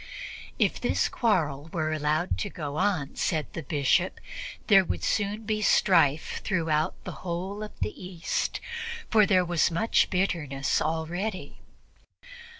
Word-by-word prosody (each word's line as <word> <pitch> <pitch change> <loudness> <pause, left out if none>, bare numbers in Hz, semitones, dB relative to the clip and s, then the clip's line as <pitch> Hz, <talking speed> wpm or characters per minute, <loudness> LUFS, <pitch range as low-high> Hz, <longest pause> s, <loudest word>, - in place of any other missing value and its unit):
If - - +1
this - - +2
quarrel 160 - 0
were 155 -2 -1
allowed 155 +3 0
to 205 - -2
go 150 -5 -5
on, 180 -7 0
said 155 -4 0
the 165 - -4
Bishop, 150 +5 +1 0.5
there 195 -3 +6
would - - -3
soon 210 +1 0
be 215 0 -1
strife 165 -8 +3
throughout 160 -5 0
the - - -5
whole 185 +4 -4
of 215 - -8
the - - -1
East, 180 -2 -2 0.5
for 215 -3 +6
there 185 -3 +4
was 175 -1 +2
much 170 +7 +2
bitterness 160 -8 0
already. 175 +6 -3
175 Hz, 135 wpm, -27 LUFS, 155-195 Hz, 0.5 s, there